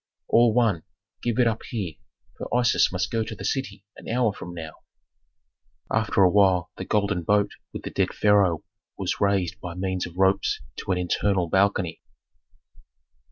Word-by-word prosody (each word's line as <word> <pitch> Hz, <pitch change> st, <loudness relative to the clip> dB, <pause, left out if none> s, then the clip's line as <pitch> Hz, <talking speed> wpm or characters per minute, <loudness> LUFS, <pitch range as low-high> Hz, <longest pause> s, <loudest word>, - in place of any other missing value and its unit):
"All 120 Hz, 0 st, +5 dB
one 110 Hz, -7 st, +2 dB, 0.4 s
give 120 Hz, -2 st, -1 dB
it 125 Hz, -, +4 dB
up 115 Hz, -1 st, 0 dB
here, 100 Hz, -9 st, -4 dB, 0.4 s
for -, -, -7 dB
Isis 120 Hz, -2 st, +3 dB
must -, -, -2 dB
go 115 Hz, -1 st, 0 dB
to 110 Hz, 0 st, -6 dB
the 95 Hz, -, -7 dB
city 130 Hz, -5 st, -3 dB
an -, -, -10 dB
hour 120 Hz, -3 st, +1 dB
from 90 Hz, -, -8 dB
now." 80 Hz, -2 st, -6 dB, 1.2 s
After 110 Hz, -3 st, +2 dB
a 90 Hz, -, +6 dB
while 95 Hz, -4 st, +3 dB
the -, -, -5 dB
golden 100 Hz, -3 st, 0 dB
boat 100 Hz, +4 st, +2 dB, 0.2 s
with -, -, -7 dB
the -, -, -5 dB
dead -, -, 0 dB
pharaoh 100 Hz, -6 st, +3 dB, 0.3 s
was -, -, -2 dB
raised 100 Hz, -4 st, +1 dB
by 85 Hz, -2 st, -6 dB
means 95 Hz, 0 st, -2 dB
of 90 Hz, 0 st, -13 dB
ropes 95 Hz, +1 st, +2 dB, 0.2 s
to -, -, -4 dB
an 90 Hz, -, +1 dB
internal 90 Hz, 0 st, 0 dB
balcony. 95 Hz, -2 st, +1 dB
100 Hz, 165 wpm, -25 LUFS, 90-110 Hz, 1.2 s, a